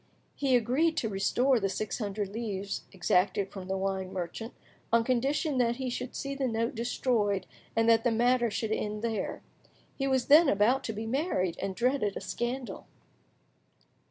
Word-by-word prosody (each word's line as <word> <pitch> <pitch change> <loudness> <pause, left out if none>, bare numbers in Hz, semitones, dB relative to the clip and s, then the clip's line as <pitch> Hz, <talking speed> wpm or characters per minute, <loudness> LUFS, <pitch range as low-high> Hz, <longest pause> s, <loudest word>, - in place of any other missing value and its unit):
He 270 -3 +2
agreed 260 +8 +2
to 225 - 0
restore 245 +6 +2
the 195 -2 0
six 215 +5 -3
hundred 205 -2 -3
livres 200 -2 -4
exacted 190 +1 +1
from 190 -2 -8
the 190 0 -1
wine 190 -1 -2
merchant, 190 +5 -5 0.4
on 230 0 +4
condition 270 +4 0
that 235 -1 +2
he 260 -1 -3
should 250 +1 -5
see 275 0 -3
the 275 -1 -1
note 230 +1 -1
destroyed 230 -4 0 0.3
and 225 0 +3
that 225 -1 +5
the 245 - +3
matter 240 +1 +3
should 220 +1 -2
end 210 0 -2
there. 225 -2 -2 0.5
He 275 - -1
was 260 -2 +1
then 300 +3 +7
about 215 +7 +3
to 225 - -3
be 215 +1 -5
married, 225 - 0
and 195 -1 -3
dreaded 240 -4 +1
a - - -5
scandal. 240 -3 -4
230 Hz, 170 wpm, -29 LUFS, 200-255 Hz, 0.5 s, then